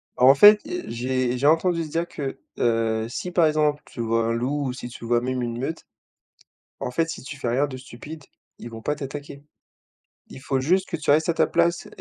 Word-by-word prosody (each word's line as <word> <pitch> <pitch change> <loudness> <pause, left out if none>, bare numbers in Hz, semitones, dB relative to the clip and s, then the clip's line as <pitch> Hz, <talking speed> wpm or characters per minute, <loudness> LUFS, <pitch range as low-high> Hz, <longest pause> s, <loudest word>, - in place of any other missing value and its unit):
Bah 125 - -1
en 135 +2 +9
fait, 210 +6 +9
heu, 355 +2 -4
j'ai 125 +1 -1
j'ai 140 +3 +2
entendu 165 0 +2
dire 165 +3 -2
que, 140 -2 -5 0.2
heu, 115 -1 +1
si 180 +8 -5
par 170 -2 +4
exemple 150 -1 +1
tu 120 - -7
vois 115 0 +1
un 115 - 0
loup 140 +5 -1
ou 125 - -3
si 125 - -7
tu 120 -1 -10
vois 120 0 +2
même 130 0 -2
une 120 0 -4
meute, 160 +5 -4 0.9
bah - - -3
en - - -5
fait 165 +5 0
si - - -6
tu 140 +2 -8
fais 125 -3 -2
rien 135 +5 +1
de 130 -2 -7
stupide 145 +4 -10 0.4
ils 120 - -8
vont 115 -1 -9
pas 150 +6 -1
t'attaquer. 145 0 -8 0.9
Il 130 - -11
faut 135 0 -1
juste 185 +8 +1
que 170 - -2
tu 150 - -5
restes 155 +3 +4
à 170 - +3
ta - - +2
place 170 0 +1
140 Hz, 230 wpm, -24 LUFS, 120-160 Hz, 0.9 s, en